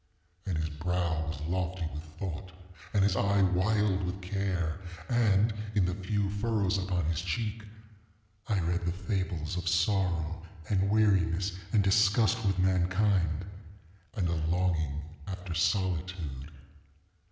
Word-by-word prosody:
And 90 Hz, -5 st, 0 dB
his 80 Hz, 0 st, -1 dB
brow 80 Hz, 0 st, -1 dB
was 80 Hz, -1 st, -4 dB
lofty 90 Hz, +1 st, -2 dB
with 75 Hz, +1 st, -6 dB
thought, 90 Hz, 0 st, -5 dB, 0.4 s
and 100 Hz, -2 st, +3 dB
his 100 Hz, -1 st, +3 dB
eye 100 Hz, 0 st, +3 dB
wild 95 Hz, +2 st, +2 dB
with 90 Hz, +2 st, -3 dB
care; 90 Hz, -3 st, -1 dB, 0.3 s
and, 110 Hz, -3 st, +3 dB, 0.2 s
in 100 Hz, -3 st, +4 dB
the 90 Hz, -, 0 dB
few 100 Hz, +1 st, -1 dB
furrows 105 Hz, -2 st, +1 dB
upon 90 Hz, -3 st, -1 dB
his 80 Hz, 0 st, 0 dB
cheek 105 Hz, +5 st, -2 dB, 0.9 s
I 105 Hz, -3 st, +1 dB
read 85 Hz, +1 st, -1 dB
the -, -, +2 dB
fables 90 Hz, -3 st, -2 dB
of 85 Hz, -1 st, -1 dB
sorrow, 85 Hz, -2 st, +1 dB, 0.3 s
and 100 Hz, -1 st, +2 dB
weariness, 95 Hz, -3 st, +3 dB, 0.2 s
and 105 Hz, -3 st, +4 dB
disgust 105 Hz, +3 st, +3 dB
with 95 Hz, -3 st, +1 dB
mankind, 90 Hz, -2 st, +2 dB, 0.7 s
and 95 Hz, -5 st, 0 dB
a 85 Hz, -2 st, -1 dB
longing 80 Hz, -4 st, 0 dB, 0.2 s
after 95 Hz, -2 st, -5 dB
solitude. 85 Hz, -5 st, -1 dB
95 Hz, 130 wpm, -30 LUFS, 85-100 Hz, 0.9 s, in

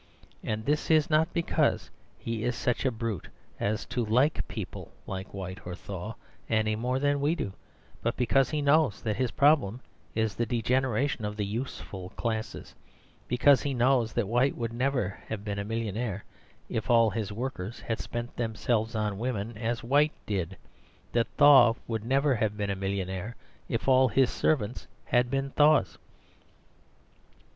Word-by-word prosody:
And 110 Hz, 0 st, -3 dB
this 150 Hz, +1 st, +2 dB
not 160 Hz, +2 st, +3 dB
because 170 Hz, -1 st, 0 dB, 0.3 s
he 115 Hz, -1 st, -4 dB
is 125 Hz, -, 0 dB
such 125 Hz, +3 st, -1 dB
a 130 Hz, -, +3 dB
brute 115 Hz, -4 st, -4 dB, 0.3 s
as 105 Hz, 0 st, -1 dB
to 125 Hz, 0 st, -2 dB
like 125 Hz, +8 st, +2 dB
people -, -, -7 dB
like 95 Hz, +1 st, -6 dB
White 95 Hz, -1 st, -6 dB
or 90 Hz, 0 st, -6 dB
Thaw 100 Hz, +3 st, -7 dB, 0.3 s
any 110 Hz, -1 st, +2 dB
more 125 Hz, +4 st, -1 dB
than 145 Hz, +1 st, +1 dB
we 150 Hz, +4 st, +2 dB
do, 100 Hz, -, -4 dB, 0.5 s
but 115 Hz, -, -1 dB
because 130 Hz, +2 st, +3 dB
he 150 Hz, -2 st, -1 dB
knows 145 Hz, -6 st, +3 dB
that 110 Hz, -2 st, 0 dB
his 130 Hz, -1 st, +1 dB
problem 140 Hz, -6 st, +3 dB, 0.4 s
is 110 Hz, -2 st, +1 dB
the 120 Hz, +3 st, -1 dB
degeneration 125 Hz, +1 st, 0 dB
of 105 Hz, 0 st, -3 dB
the 105 Hz, -, -1 dB
useful 100 Hz, -4 st, -5 dB
classes; 110 Hz, -2 st, -4 dB, 0.5 s
because 130 Hz, +2 st, +5 dB
he 140 Hz, -2 st, -2 dB
knows 125 Hz, -1 st, +3 dB
that 120 Hz, -4 st, 0 dB
White 120 Hz, +5 st, +2 dB
would 115 Hz, -1 st, -3 dB
never 125 Hz, -5 st, -1 dB
have 105 Hz, -1 st, -5 dB
been 100 Hz, -1 st, -3 dB
a -, -, -2 dB
millionaire 110 Hz, -1 st, -3 dB, 0.4 s
if 110 Hz, -, -3 dB
all 115 Hz, -2 st, +5 dB
his 110 Hz, -3 st, -3 dB
workers 115 Hz, -2 st, -5 dB
had 115 Hz, -, -3 dB
spent 120 Hz, 0 st, -5 dB
themselves 115 Hz, -1 st, -1 dB
on 105 Hz, -2 st, -1 dB
women 115 Hz, -2 st, -3 dB
as 115 Hz, +2 st, -2 dB
White 145 Hz, +5 st, +3 dB
did, 95 Hz, -3 st, -2 dB, 0.5 s
that 115 Hz, -2 st, +1 dB
Thaw 135 Hz, -6 st, +8 dB
would 110 Hz, -2 st, -3 dB
never 135 Hz, +4 st, +2 dB
have 110 Hz, -3 st, -1 dB
been 100 Hz, -1 st, -1 dB
a -, -, -1 dB
millionaire 95 Hz, +3 st, -3 dB, 0.3 s
if 115 Hz, -, -2 dB
all 130 Hz, 0 st, +6 dB
his 130 Hz, +3 st, +3 dB
servants 120 Hz, -6 st, 0 dB, 0.2 s
had 120 Hz, 0 st, +2 dB
been 135 Hz, +1 st, -1 dB
Thaws. 150 Hz, +2 st, +4 dB
115 Hz, 160 wpm, -28 LUFS, 105-130 Hz, 0.5 s, Thaw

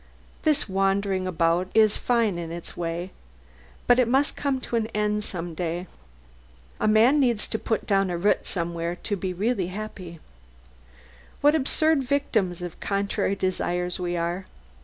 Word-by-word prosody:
This 305 Hz, -2 st, +2 dB
wandering 195 Hz, -1 st, +1 dB
about 170 Hz, +1 st, +1 dB
is 215 Hz, -2 st, +5 dB
fine 230 Hz, -7 st, +1 dB
in 165 Hz, -1 st, -5 dB
its 170 Hz, 0 st, -7 dB
way, 170 Hz, +2 st, -3 dB, 0.7 s
but 245 Hz, +1 st, +5 dB
it 250 Hz, -, +4 dB
must 270 Hz, +4 st, +2 dB
come 275 Hz, -2 st, -1 dB
to 240 Hz, -, -3 dB
an 225 Hz, -1 st, +1 dB
end 210 Hz, 0 st, +1 dB
some 175 Hz, -4 st, -4 dB
day. 175 Hz, +1 st, -3 dB, 0.9 s
A -, -, +1 dB
man 225 Hz, +7 st, +5 dB
needs 240 Hz, -6 st, +2 dB
to 220 Hz, -, -2 dB
put 220 Hz, -, -1 dB
down 195 Hz, -1 st, +2 dB
a 175 Hz, -, -2 dB
root 200 Hz, +5 st, +1 dB
somewhere 170 Hz, -1 st, -2 dB
to 205 Hz, -, -1 dB
be 190 Hz, -1 st, -3 dB
really 195 Hz, +1 st, 0 dB
happy. 185 Hz, -3 st, -7 dB, 1.2 s
What 290 Hz, +1 st, +5 dB
absurd 315 Hz, 0 st, +2 dB
victims 220 Hz, -10 st, 0 dB
of 175 Hz, -2 st, -7 dB
contrary 200 Hz, 0 st, -1 dB
desires 180 Hz, -1 st, -1 dB
we 175 Hz, -1 st, -2 dB
are! 170 Hz, +3 st, -2 dB
195 Hz, 155 wpm, -25 LUFS, 175-225 Hz, 1.2 s, is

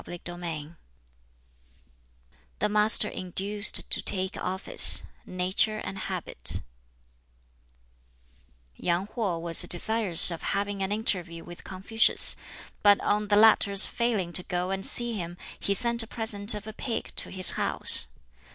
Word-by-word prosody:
BOOK 175 Hz, -1 st, -11 dB
XVII 165 Hz, -4 st, -8 dB, 1.9 s
The 210 Hz, -, -3 dB
Master 210 Hz, 0 st, +3 dB
Induced 200 Hz, +3 st, +1 dB
to -, -, 0 dB
Take 190 Hz, -1 st, -5 dB
Office 190 Hz, +2 st, +2 dB, 0.2 s
Nature 185 Hz, +4 st, -3 dB
and 195 Hz, -, -8 dB
Habit -, -, -4 dB, 2.1 s
Yang 175 Hz, +2 st, -3 dB
Ho 200 Hz, -8 st, -4 dB
was 165 Hz, 0 st, +2 dB
desirous 190 Hz, -2 st, +3 dB
of 170 Hz, -, -8 dB, 0.2 s
having 200 Hz, 0 st, -5 dB
an 190 Hz, +1 st, -4 dB
interview 180 Hz, -6 st, -4 dB
with 175 Hz, 0 st, -14 dB
Confucius, 195 Hz, +4 st, +3 dB, 0.5 s
but 205 Hz, -1 st, +3 dB
on 210 Hz, 0 st, -2 dB
the 205 Hz, -, 0 dB
latter's 205 Hz, -2 st, +3 dB
failing 215 Hz, -8 st, -4 dB
to 180 Hz, -, +2 dB
go 180 Hz, +1 st, -5 dB
and 195 Hz, 0 st, -5 dB
see 240 Hz, +2 st, +3 dB
him, 175 Hz, -4 st, -8 dB, 0.2 s
he 200 Hz, -, -2 dB
sent 235 Hz, +1 st, 0 dB
a 225 Hz, -, -5 dB
present 215 Hz, -1 st, +2 dB
of 210 Hz, 0 st, -9 dB
a 220 Hz, -, -10 dB
pig 230 Hz, +1 st, -7 dB
to -, -, -1 dB
his 185 Hz, -1 st, +5 dB
house. -, -, +4 dB
195 Hz, 135 wpm, -24 LUFS, 180-215 Hz, 2.1 s, his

